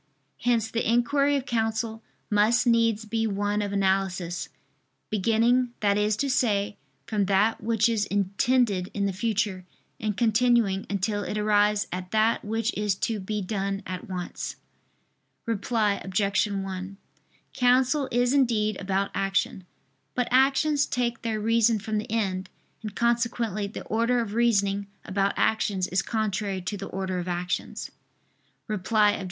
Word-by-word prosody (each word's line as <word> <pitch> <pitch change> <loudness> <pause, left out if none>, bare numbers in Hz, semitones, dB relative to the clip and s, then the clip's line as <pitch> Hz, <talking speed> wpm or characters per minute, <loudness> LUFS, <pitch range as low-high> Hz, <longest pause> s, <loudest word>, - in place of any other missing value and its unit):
Hence 230 -2 +1
the 230 - 0
inquiry 280 +4 +2
of 270 -2 -1
counsel 225 -2 -1 0.3
must 215 +4 +3
needs 230 -2 +2
be 225 +1 -1
one 205 0 -1
of 205 -1 -2
analysis, 190 -3 0 0.6
beginning 230 +4 +2
that 200 -1 +3
is 210 0 +1
to 280 - 0
say, 210 -6 +1 0.3
from 215 -3 0
that 200 +4 +2
which 220 0 +2
is 225 -3 +1
intended 200 0 +1
in 200 -1 0
the 195 - -1
future, 205 -2 -1 0.4
and 210 -2 -2
continuing 230 -4 +2
until 205 +1 -1
it 210 - -3
arrives 210 0 +3
at 180 0 -5
that 220 +2 +2
which 225 +2 -1
is 210 -2 0
to 220 +3 -2
be 205 +1 -3
done 195 0 -2
at 185 0 -6
once. 180 -2 -5 0.9
Reply 215 -2 0
Obj. 195 +2 +1
1: 195 -1 -5 0.6
Counsel 260 +2 +3
is 245 +2 +2
indeed 220 -7 +2
about 195 +1 -1
action. 195 -1 -1 0.5
But 250 -1 0
actions 275 +3 +3
take 235 -1 -1
their 225 -2 -2
reason 230 +1 +3
from 215 +1 -2
the 210 - -7
end; 190 -4 -1 0.3
and 215 -2 -7
consequently 235 -3 0
the 200 - -7
order 230 +3 +1
of 220 -3 -3
reasoning 200 -4 +2 0.2
about 195 +1 0
actions 200 -4 +1
is 185 +2 +1
contrary 205 -3 -2
to 205 - -3
the 200 0 -6
order 190 -1 -3
of 175 - -5
actions. 175 0 -3 0.8
Reply 210 0 +2
Obj. - - -3
210 Hz, 145 wpm, -26 LUFS, 195-230 Hz, 0.9 s, must